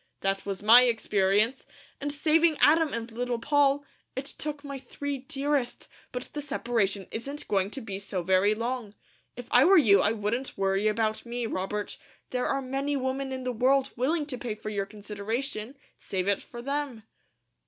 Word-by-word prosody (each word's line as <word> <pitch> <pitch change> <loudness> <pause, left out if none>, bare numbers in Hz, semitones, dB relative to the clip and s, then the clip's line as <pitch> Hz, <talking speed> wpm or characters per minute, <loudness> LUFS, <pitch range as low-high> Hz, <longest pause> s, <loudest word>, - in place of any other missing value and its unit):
That 195 +1 -1
was 200 0 -4
my 240 +4 +9
experience, 215 +1 +1 0.3
and 290 0 -2
saving 310 +2 +3
Adam 315 0 +5
and 230 0 -4
Little 245 +1 -2
Poll, 285 +2 +2 0.3
it 260 - -3
took 295 0 -5
my 280 -1 -6
three 280 +2 -5
dearest; 275 -1 -2 0.2
but 250 0 -4
the 295 - -3
separation 230 -9 -1
isn't 280 +6 -6
going 195 -1 +1
to 270 - -7
be 200 -4 -5
so 195 -2 -3
very 190 +4 +3
long. 230 -2 -3 0.4
If 245 0 -8
I 245 - +7
were 385 +4 +7
you 200 - +6
I 210 - +2
wouldn't 225 +5 -2
worry 195 +2 +1
about 215 0 0
me, 240 0 -3
Robert. 205 0 -3 0.3
There 250 -1 0
are 275 0 0
many 275 +2 -1
women 265 +1 -2
in 260 -1 -4
the 255 - -1
world 265 +3 +2
willing 295 +6 0
to 260 -4 -5
pay 225 -3 -3
for 215 0 -6
your 200 -1 -2
consideration; 215 +5 -4 0.2
save 185 -1 -3
it 200 - +2
for 240 -1 -10
them." 275 -4 -3
245 Hz, 175 wpm, -28 LUFS, 210-275 Hz, 0.4 s, my